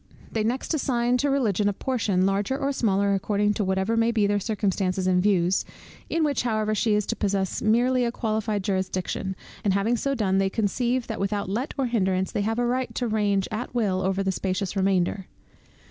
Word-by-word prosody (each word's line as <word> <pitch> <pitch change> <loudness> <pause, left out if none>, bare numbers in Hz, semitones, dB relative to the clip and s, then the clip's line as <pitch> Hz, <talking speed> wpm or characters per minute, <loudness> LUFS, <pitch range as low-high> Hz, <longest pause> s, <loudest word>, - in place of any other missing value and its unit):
They 220 - 0
next 245 +8 -1
assign 250 -4 +1
to 285 +3 +1
Religion 215 -7 +1
a - - -1
portion, 205 -6 0
larger 200 +6 0
or 280 0 -1
smaller 200 -6 +1
according 205 +1 +1
to 210 - -1
whatever 190 +3 0
may 230 0 +3
be 220 -3 +2
their 205 0 +1
circumstances 195 -3 -1
and 180 -1 +3
views, 185 -2 +2 0.5
in 330 - +1
which 290 -4 +1
however 215 -3 0
she 215 0 +2
is 210 -1 +1
to 230 - -2
possess 195 -3 -1
merely 245 +3 +3
a 235 - 0
qualified 215 -3 -1
jurisdiction, 190 0 -2 0.3
and 195 -2 +2
having 210 +5 +2
so 275 +3 -1
done, 195 -5 +1
they 195 0 +2
conceive 240 +4 0
that 225 - -5
without 200 0 -1
let 245 +8 -2
or 270 - +1
hindrance 190 -6 0
they - - -1
have 225 +2 -1
a 245 - +1
right 255 +1 -1
to 245 - -1
range 205 -3 +1
at 240 +3 -5
will 195 -6 +1
over 195 +1 0
the 190 - +1
spacious 190 +1 -2
remainder. 190 -1 +1
210 Hz, 200 wpm, -25 LUFS, 195-235 Hz, 0.5 s, may